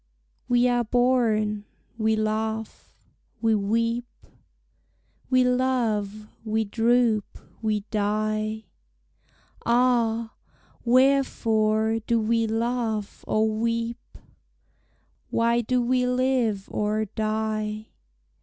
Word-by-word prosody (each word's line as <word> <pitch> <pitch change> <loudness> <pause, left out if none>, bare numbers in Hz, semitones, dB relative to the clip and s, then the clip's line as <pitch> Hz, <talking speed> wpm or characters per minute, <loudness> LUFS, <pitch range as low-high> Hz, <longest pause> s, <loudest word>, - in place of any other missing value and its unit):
We 245 0 +3
are 245 -1 +2
born; 220 -4 +1 0.3
we 220 -1 +1
laugh; 220 0 -3 0.5
we 225 0 +2
weep; 230 +3 0 1.2
We 255 -1 +4
love; 230 -5 0 0.2
we 220 0 0
droop; 225 0 +1 0.2
we 215 -2 0
die! 215 +1 -1 1.0
Ah! 235 -2 +2 0.5
wherefore 225 -4 +2
do 230 +1 0
we 225 +1 +1
laugh 225 -2 -2
or 215 +1 +2
weep? 230 +1 -3 1.1
Why 235 +1 +2
do 250 +2 0
we 250 +1 +1
live 250 -5 0
or 215 +1 0
die? 215 0 -3
225 Hz, 85 wpm, -25 LUFS, 215-240 Hz, 1.2 s, We